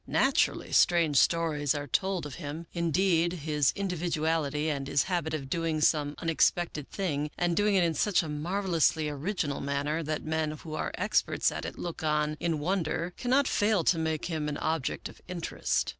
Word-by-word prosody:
Naturally, - - +1
strange 165 -5 +4
stories 155 -4 +2
are 145 0 -3
told 185 +4 0
of 145 - -7
him; 155 +3 -5
indeed, 170 0 +2
his 150 -4 +1
individuality 160 -5 -1
and 140 -3 -2
his 140 - +2
habit 175 -4 -1
of 140 -3 -5
doing 165 +1 -1
some 150 -1 +2
unexpected 165 -2 0
thing, 150 -6 -2
and 175 -1 +1
doing 205 +2 +2
it 185 - +4
in 165 -1 +1
such 200 +4 +2
a - - -5
marvelously 165 0 +1
original 150 0 -2
manner 140 +3 -1
that 155 -1 -3
men 160 0 -1
who 155 +1 -8
are - - -2
experts - - +1
at - - -5
it - - -6
look 170 -2 -5
on 150 0 +1
in 165 -2 0
wonder, 170 +1 -1
cannot 260 +3 +2
fail 205 -4 +2
to 165 +1 +3
make 160 -1 -1
him 155 -3 -2
an 145 - -3
object 160 -4 -2
of - - -15
interest. 180 -2 -1
160 Hz, 175 wpm, -29 LUFS, 150-175 Hz, -, strange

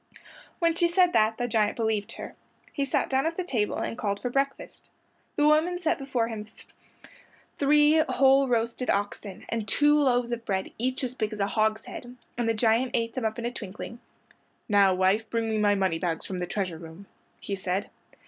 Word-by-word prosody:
When 335 -2 +2
she 340 +1 +2
said 355 +1 +3
that 220 0 +3
the 245 - -1
giant 215 -2 +1
believed 220 -3 -1
her. - - -8 0.4
He 280 - -1
sat 270 - 0
down 270 +3 +1
at 330 - -3
the 370 - -1
table 230 -11 -1
and - - -3
called 200 -1 -1
for 245 - -3
breakfast. 275 +1 -3 0.5
The 295 - +2
woman 310 +4 +3
set 355 -3 0
before 255 -4 -1
him 215 -2 -6 1.1
three 295 +2 +5
whole 270 +1 +4
roasted 235 +1 -1
oxen 200 -1 -2
and 225 -2 -3
two 295 +4 +4
loaves 245 -3 +2
of 235 -1 -3
bread 190 -3 -2
each 255 +3 -1
as 250 -1 -2
big 220 -4 -2
as 215 - -7
a 200 - +2
hogshead, 220 +4 -2 0.2
and 235 -1 -1
the 225 - +1
giant 230 +3 +2
ate 230 -1 -1
them 255 -3 -3
up 220 0 -1
in 235 - -4
a 240 - -1
twinkling. 220 +1 -8 0.7
"Now, 200 -2 +5
wife, 190 +4 +1
bring 230 -1 -1
me 220 -1 0
my 205 -1 +3
moneybags 175 -3 -1
from 185 -1 -5
the 180 - -3
treasure 180 -5 -3
room," 165 +4 -11 0.3
he 200 - -4
said. 190 +1 -3
230 Hz, 195 wpm, -27 LUFS, 205-265 Hz, 1.1 s, three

